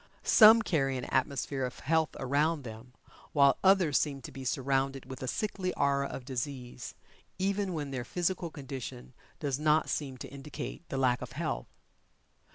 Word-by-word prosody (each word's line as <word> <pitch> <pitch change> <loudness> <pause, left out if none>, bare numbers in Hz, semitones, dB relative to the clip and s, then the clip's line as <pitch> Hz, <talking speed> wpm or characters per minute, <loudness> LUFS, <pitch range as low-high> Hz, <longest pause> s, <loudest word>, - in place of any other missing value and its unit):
Some 225 +1 +8
carry 135 -8 +1
an 125 - -4
atmosphere 135 0 -1
of 125 -1 -5
health 160 +1 +1
around 145 +3 +1
them, 115 +1 -10 0.4
while 140 -2 +5
others 185 -6 +5
seem 140 -3 -1
to - - -8
be 135 - -8
surrounded 135 +1 0
with 130 -1 -9
a 130 - -3
sickly 190 - -2
aura 140 -1 +2
of 130 - -7
disease, 125 -1 -5 0.4
even 195 0 0
when 145 -4 -4
their 130 -2 -3
physical 175 +5 -1
condition 130 -4 -7 0.3
does 140 -3 -1
not 155 +1 +3
seem 135 -4 -3
to - - -7
indicate 140 +2 -7
the 135 - -3
lack 125 -2 +2
of 125 -1 -7
health. 155 +1 -3
140 Hz, 165 wpm, -31 LUFS, 130-160 Hz, 0.4 s, Some